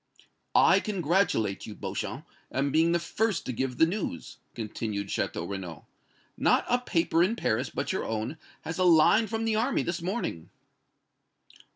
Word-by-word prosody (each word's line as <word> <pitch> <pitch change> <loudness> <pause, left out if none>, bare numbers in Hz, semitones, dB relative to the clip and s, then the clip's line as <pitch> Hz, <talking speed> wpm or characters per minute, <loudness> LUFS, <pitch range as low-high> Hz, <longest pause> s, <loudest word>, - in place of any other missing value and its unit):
"I - - +6
congratulate 175 - 0
you, 105 - -8
Beauchamp, - - -5 0.3
on 140 +1 0
being 165 +3 +3
the 175 - +3
first 200 +4 -1
to 125 - -3
give 125 +1 -2
the 160 - +6
news," 170 - -4 0.2
continued 105 -2 -4
Château - - -2
Renaud. 95 -5 -6 0.5
"Not - - +2
a 245 - +2
paper 170 -7 +1
in 190 +6 +3
Paris 125 - 0
but - - -3
your - - -2
own 115 +8 -3 0.2
has 165 +3 -5
a - - +3
line 175 +6 +5
from 225 +2 -2
the 225 -1 +1
army 245 +5 +1
this 175 0 -3
morning." 180 - -3
165 Hz, 160 wpm, -28 LUFS, -, 0.5 s, I